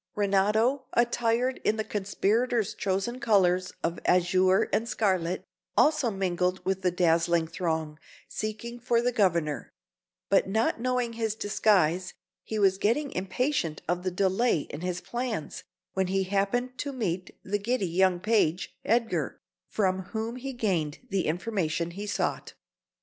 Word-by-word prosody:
Renato, 210 +6 +2
attired 240 +1 +1
in 215 - +2
the 220 - -1
conspirators' 215 +2 0
chosen 195 +6 -2
colours 185 -6 +3
of 165 +1 -1
azure 185 +3 +4
and 230 +2 +1
scarlet, 185 -5 0 0.3
also 300 -5 +4
mingled 185 -2 0
with 190 0 0
the 185 - +2
dazzling 170 -1 +2
throng, 160 -2 -3 0.3
seeking 235 +3 -5
for 240 -1 +2
the 245 +1 +1
Governor; 170 -9 0 0.6
but 195 -1 +3
not 220 +3 +1
knowing 250 -1 0
his 225 -2 -2
disguise, 185 -5 +2 0.3
he 220 - -4
was 195 -2 +3
getting 270 +8 +1
impatient 190 - -1
of 175 +1 0
the 185 - -1
delay 190 +1 +2
in 145 - -6
his 180 0 -3
plans, 230 -2 -4 0.3
when 190 -1 0
he 195 +1 +1
happened 200 +6 0
to 285 - -2
meet 185 -8 -3
the 205 +2 -1
giddy 230 0 0
young 180 +1 +2
page, 195 -4 +1
Edgar, 230 0 0 0.3
from 190 -3 0
whom 225 +2 -2
he 270 +2 -5
gained 185 - -1
the 190 -2 0
information 170 -2 -1
he 200 +4 -6
sought. - - -2
195 Hz, 140 wpm, -28 LUFS, 180-230 Hz, 0.6 s, azure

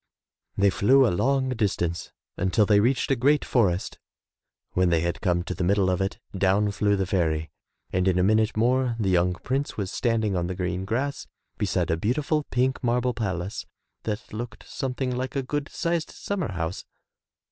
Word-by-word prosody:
They 100 0 +4
flew 130 +8 +5
a 115 - +2
long 135 +5 +1
distance 100 -8 -1 0.2
until 95 +3 +2
they 100 0 +5
reached 125 +5 +1
a - - +4
great 140 +5 +2
forest. 95 -7 +1 0.7
When 90 -1 +2
they 85 -2 +2
had 85 +1 -2
come 90 -4 +1
to - - -4
the 95 - -3
middle 95 +1 +3
of 90 - 0
it, 95 +1 -1 0.2
down 100 +2 +2
flew 100 0 +1
the 95 -1 0
fairy, 80 -5 0 0.4
and 90 +1 +1
in 95 -1 +3
a 90 - +3
minute 110 +2 +2
more 125 +1 +2
the 100 -4 +1
young 90 0 +3
prince 135 +8 -3
was 100 -3 -3
standing 110 -4 0
on 85 -1 0
the 95 - -3
green 90 +1 -2
grass 130 +7 -2 0.3
beside - - 0
a 80 - +1
beautiful 145 - 0
pink 130 +2 0
marble 125 +1 +1
palace 95 -4 -3 0.3
that 110 +1 -5
looked 115 0 -7
something 130 -1 -3
like 130 +2 -3
a 135 - 0
good 145 +2 -3
sized 170 -2 -1
summer 200 - -3
house. 85 0 -3
105 Hz, 180 wpm, -26 LUFS, 90-125 Hz, 0.7 s, flew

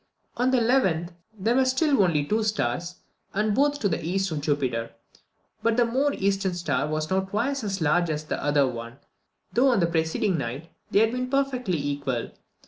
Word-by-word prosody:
On 250 +1 +1
the 260 - +3
11th, 225 -9 +2 0.3
there 220 +4 +1
were 265 +1 +4
still 265 +1 +2
only 160 -6 +2
two 215 +7 +1
stars, 175 - -1 0.4
and 210 +1 +1
both 285 +4 +2
to 205 - +2
the 160 - -2
east 190 +3 -1
of 150 -2 -2
Jupiter; 130 -6 -1 0.7
but 230 0 +1
the 240 - +4
more 265 +5 +1
eastern 195 -1 0
star 150 -5 -1
was 155 +2 -2
now 190 - +3
twice 220 +8 -2
as 195 -3 -3
large 170 +3 +2
as 155 -1 -2
the 155 - -4
other 145 -1 +3
one, 115 0 -6 0.6
though 245 +6 +4
on 240 -5 +3
the 170 - +3
preceding 165 +2 0
night 135 +7 -5 0.2
they 205 - +4
had 225 0 +3
been 250 +1 -3
perfectly 255 -9 0
equal. 140 -4 -3
190 Hz, 190 wpm, -25 LUFS, 155-235 Hz, 0.7 s, were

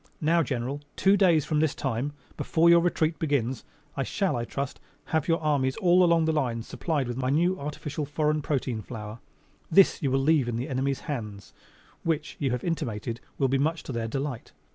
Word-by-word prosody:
Now, 165 +2 +3
General, 135 0 -3
two 195 +1 +4
days 175 -7 +4
from 150 0 0
this 155 -2 +1
time 130 +6 -2 0.2
before 170 +1 +3
your 170 - +7
retreat 165 -2 0
begins 135 -5 0 0.3
I 140 - -1
shall, 190 +6 0
I 120 -1 -2
trust, 140 +3 -4 0.3
have 160 -2 +1
your 165 -1 +2
armies 145 -4 +1
all 180 -3 +5
along 170 -2 +4
the 160 - +2
lines 120 -6 -1
supplied 150 -6 -2
with 120 0 -4
my 130 -1 -1
new 175 +6 +2
artificial, 150 0 -4
foreign 150 +1 0
protein 130 -6 -2
flour. 110 -1 -8 0.5
This 190 +3 +5
you 140 - +1
will 135 - +2
leave 140 -3 +3
in 120 - -2
the 125 +6 -3
enemy's 135 +1 -1
hands, 105 -9 -6 0.5
which, 160 -2 -2
you 140 - 0
have 125 -1 -2
intimated, 115 - -3 0.2
will 135 - +2
be 135 +1 +1
much 160 +4 0
to - - -6
their 115 -2 -2
delight. 135 0 -4
145 Hz, 195 wpm, -27 LUFS, 125-160 Hz, 0.5 s, your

